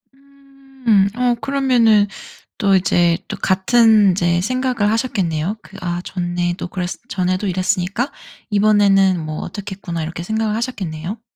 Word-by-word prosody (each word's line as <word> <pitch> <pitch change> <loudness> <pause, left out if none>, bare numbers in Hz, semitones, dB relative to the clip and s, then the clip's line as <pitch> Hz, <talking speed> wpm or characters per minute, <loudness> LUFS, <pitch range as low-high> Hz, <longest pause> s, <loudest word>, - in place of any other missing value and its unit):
음 270 -6 -1
어 245 0 +1
그러면은 240 -5 +3 0.5
또 195 -1 +3
이제 175 -2 +2
또 - - -5
같은 210 +1 +4
이제 175 -1 +1
생각을 250 -1 0
하셨겠네요. 200 -6 -1
그 195 - -14
'아 175 -1 -3
좋네 175 -1 -2
또 - - -5
그랬 180 0 -4 0.2
전에도 185 -2 -1
이랬으니까 185 +6 -1 0.4
이번에는 200 -3 +3
뭐 155 0 -5
어떻겠구나.' 190 -3 -6
이렇게 165 +2 -5
생각을 220 +2 -1
하셨겠네요? 205 -5 -4
200 Hz, 305 characters per minute, -19 LUFS, 175-235 Hz, 0.5 s, 같은